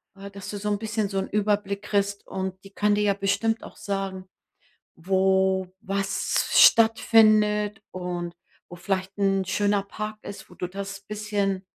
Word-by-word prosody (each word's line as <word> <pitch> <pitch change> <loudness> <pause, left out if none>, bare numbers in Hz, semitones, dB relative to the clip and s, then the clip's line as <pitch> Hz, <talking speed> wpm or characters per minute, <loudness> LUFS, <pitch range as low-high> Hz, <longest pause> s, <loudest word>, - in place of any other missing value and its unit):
ja, 195 0 -9
dass 200 -1 -9
du 205 - -5
so 210 +1 -3
'n 205 - +1
bisschen 215 -1 -2
so 195 - -3
'n 190 - -1
Überblick 205 -1 0
kriegst 200 -1 -1
und 190 0 -4
die 195 - -13
kann 205 +1 +1
dir 210 - +1
ja 205 -1 +3
bestimmt 205 +3 0
auch - - -11
sagen, 195 -2 -4 0.7
wo 190 +1 +2 0.2
was 195 0 -1
stattfindet 215 -2 +5
und 175 -1 -5 0.3
wo 175 - -10
vielleicht 195 +2 -3
'n 195 -1 +2
schöner 205 +2 +1
Park 215 +2 -6
ist, 200 -1 -9
wo - - -14
du 180 - -4
das 195 +1 -6
bisschen 200 -2 -2
200 Hz, 165 wpm, -25 LUFS, 190-210 Hz, 0.7 s, stattfindet